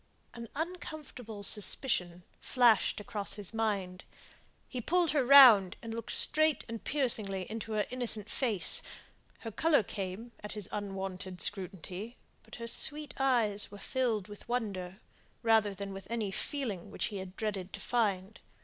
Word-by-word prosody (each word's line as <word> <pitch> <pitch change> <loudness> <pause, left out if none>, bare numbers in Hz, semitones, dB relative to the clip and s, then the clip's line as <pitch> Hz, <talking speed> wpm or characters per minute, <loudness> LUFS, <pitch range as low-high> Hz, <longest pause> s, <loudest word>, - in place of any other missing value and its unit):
An 235 -1 -8
uncomfortable 300 - -6
suspicion 190 -4 -1 0.2
flashed 240 -6 +3
across 205 0 -2
his 205 0 -3
mind. 200 -5 -2 0.6
He 250 - -4
pulled 345 +5 +2
her 290 -3 +2
round, 240 -8 +8
and 230 -1 -7
looked 230 -1 -5
straight 310 -1 +2
and 230 -1 -7
piercingly 215 -9 0
into 225 0 -5
her 210 -1 +1
innocent 235 -4 0
face. 220 -6 +3 0.6
Her 225 - -6
colour 310 +1 +3
came 195 +4 -6
at 210 - -6
his 210 -3 -3
unwonted 190 -2 -5
scrutiny, 195 +3 -4 0.2
but - - -13
her 230 - -7
sweet 295 +5 +1
eyes 235 -6 +3
were 205 - -10
filled 225 -3 -1
with 205 +2 -12
wonder, 195 -6 -3 0.4
rather 220 -3 +3
than 195 +1 -6
with 195 -1 -9
any 225 -4 -2
feeling 225 - -3
which - - -3
he 195 -2 -4
dreaded 190 0 -4
to 200 - -6
find. 205 -3 -1
215 Hz, 145 wpm, -31 LUFS, 195-245 Hz, 0.6 s, round